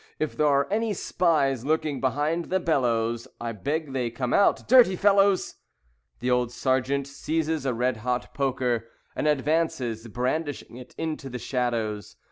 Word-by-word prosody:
If 155 - -2
there 150 - +2
are 140 -1 +3
any 220 0 +1
spies 140 -10 +1
lurking 155 -1 -1
behind 150 +6 0
the 190 - 0
bellows, 120 -8 0
I 120 -1 -3
beg 145 +6 -3
they 125 -3 -1
come 120 +1 -3
out. 200 - +3
Dirty 240 -6 +6
fellows!" 195 0 +3 0.6
The 125 +1 0
old 125 -1 +1
Sergeant 130 +2 0
seizes 155 +1 -2
a 130 - +1
red 125 0 0
hot 125 +2 -3
poker 125 -4 -1 0.3
And - - -1
advances, 135 -6 0
brandishing 125 +1 -3
it, 125 0 -12
into 155 -4 -4
the 125 - -5
shadows. 115 -4 -2
135 Hz, 150 wpm, -26 LUFS, 125-160 Hz, 0.6 s, Dirty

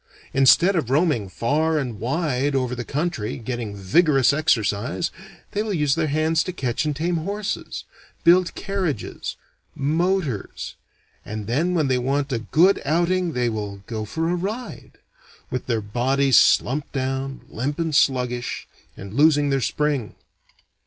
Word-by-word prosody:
Instead 170 +8 +5
of 155 -8 0
roaming 140 - +2
far 155 - +1
and 125 -7 -3
wide 140 +1 0
over 130 -2 0
the 125 0 -4
country, 140 -6 -2
getting 120 -3 -4
vigorous 135 - +3
exercise, 125 0 0 0.4
they 205 - -1
will 215 -2 -2
use 150 -4 +2
their 160 0 0
hands 155 +2 +2
to 185 - -4
catch 130 -5 -2
and 150 -1 -1
tame 170 +4 0
horses, 200 +5 -4 0.4
build 175 0 +4
carriages, 185 - -3 0.4
motors, 155 - -1 0.5
and 105 0 -6
then 155 - 0
when 155 -4 +2
they 130 -1 +2
want 135 +2 -1
a 115 - 0
good 170 - +3
outing 170 +3 +1
they 125 -1 0
will 105 -3 -4
"go 110 0 -4
for 160 +10 -2
a 175 - +1
ride," 205 +8 -5 0.5
with 125 - -3
their 115 -3 0
bodies 130 +5 +1
slumped 140 +4 +4
down, 135 0 -2
limp 140 +6 -3
and 165 -2 -1
sluggish, 125 -3 +1 0.3
and 100 +1 -9
losing 145 +1 +4
their 135 -1 +1
spring. 145 -1 -1
140 Hz, 145 wpm, -23 LUFS, 120-165 Hz, 0.5 s, Instead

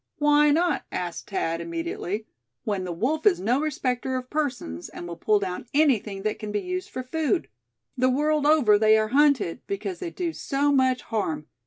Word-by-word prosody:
"Why 295 0 +4
not?" 340 +4 +2
asked 175 -2 -4
Thad, 165 -4 -1
immediately; 170 +5 -4 0.4
"when 200 -4 -2
the 180 - -4
wolf 275 - 0
is 390 - +4
no 245 +8 +1
respecter 260 -4 -1
of 255 0 -7
persons, 255 - -3
and 175 - -8
will 170 - -6
pull 210 +5 +2
down 190 +3 -4
anything 225 -10 +2
that 215 0 -2
can 210 -1 -5
be 205 - 0
used 365 - -4
for 255 - -5
food? 320 +6 -1 0.5
The 255 0 +2
world 295 +2 +1
over, 250 -10 +5
they 220 0 +5
are 215 0 0
hunted, 270 - +3
because 395 -2 -4
they 360 - -4
do 335 -1 -3
so 285 -1 0
much 260 -2 +2
harm. 160 -9 -2
255 Hz, 185 wpm, -25 LUFS, 205-300 Hz, 0.5 s, over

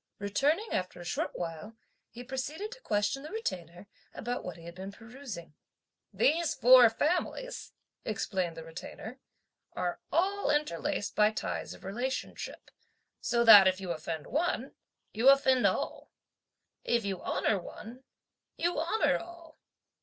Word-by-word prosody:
Returning 285 - +1
after 180 -1 -2
a 175 - -9
short - - -2
while 175 +6 -6 0.3
he 240 +2 -9
proceeded 285 - -4
to - - -11
question 210 +5 0
the 300 - -8
Retainer 180 - -5 0.3
(about 245 +2 -3
what 180 -2 -6
he 165 - -13
had 170 - -8
been 190 +2 -7
perusing.) 225 - -9 0.6
"These 325 +2 +2
four 250 -1 +8
families," 360 - -2 0.3
explained 190 -6 -2
the 165 - -6
Retainer, 180 +9 -9 0.5
"are 180 -1 -2
all 395 +5 +1
interlaced 295 -4 -1
by 210 0 +5
ties 215 - -4
of - - -17
relationship, 245 +7 -4 0.5
so 235 -1 +1
that 205 -4 +10
if 185 0 +2
you 185 -2 -4
offend 160 -1 -4
one, 345 +4 -1 0.4
you 230 +5 +5
offend 265 -4 +5
all; 185 - -2 0.7
if 235 -3 +1
you 195 -2 -3
honour 205 - 0
one, 235 +8 -10 0.5
you 345 -2 0
honour 340 +7 +1
all. 340 -2 -13
235 Hz, 140 wpm, -30 LUFS, 190-295 Hz, 0.7 s, that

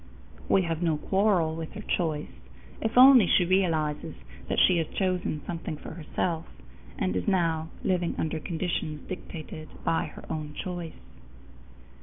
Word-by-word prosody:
We 190 - +4
have 165 -1 -2
no 165 -3 +2
quarrel 190 -3 +2
with 160 -1 -6
her 210 - -6
choice, 160 -7 -1 0.5
if 225 +2 -1
only 255 -5 +9
she 180 - +4
realizes 165 -5 +1 0.3
that - - 0
she 180 - +5
has 160 - -1
chosen 180 -5 -1
something 165 -2 -4
for - - -9
herself, 165 +1 -3 0.5
and 90 0 0
is 90 - -2
now 165 -3 +1
living 180 -3 0
under 160 0 -1
conditions 160 -2 -3
dictated 155 -4 -7 0.2
by 165 +1 +1
her 150 - -10
own 150 -1 -5
choice. 175 -3 -5
165 Hz, 145 wpm, -28 LUFS, 155-185 Hz, 0.5 s, only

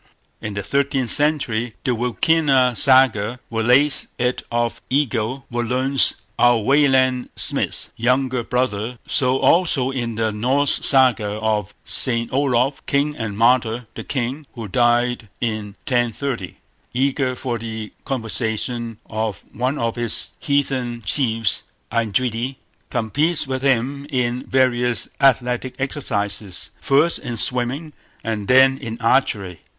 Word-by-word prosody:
In 105 -2 -5
the 100 - -3
thirteenth 140 +1 0
century 125 -7 +1
the 135 - 0
Wilkina 125 +2 +2
Saga 125 -3 +4
relates 125 +6 +3
it 125 0 -1
of 120 0 -1
Egill, 130 -2 -1
Völundr's—our 120 -1 +1
Wayland 130 +1 +2
Smith's—younger 125 +1 0
brother. 125 -2 -2
So 130 -1 +1
also 145 -6 +2
in 120 -4 -3
the 110 0 0
Norse 130 +7 +1
Saga 125 -6 +4
of 105 -2 -2
Saint 115 -2 +4
Olof, 135 0 +1
king 145 +1 0
and 110 -5 -5
martyr; 120 0 +2
the - - -7
king, 135 +3 -4
who 115 -3 -6
died 120 0 +1
in 110 -4 -3
1030, 120 - -2 0.4
eager 130 0 0
for 120 -2 -4
the 110 -1 -7
conversion 115 -1 -2
of 110 -4 -4
one 130 +6 -1
of 115 0 -2
his 120 -2 0
heathen 130 -5 -1
chiefs 115 -6 +1 0.3
Eindridi, 115 +3 -1 0.3
competes 145 +9 0
with 130 -1 -3
him 135 +1 0
in 125 -2 -2
various 125 -4 +1
athletic 125 -1 +1
exercises, 105 - -2
first 145 +5 +3
in 120 - -5
swimming 125 +7 0 0.3
and 110 -3 -3
then 130 +1 +5
in 115 -4 -6
archery. 105 -7 0
125 Hz, 115 wpm, -20 LUFS, 115-135 Hz, 0.4 s, then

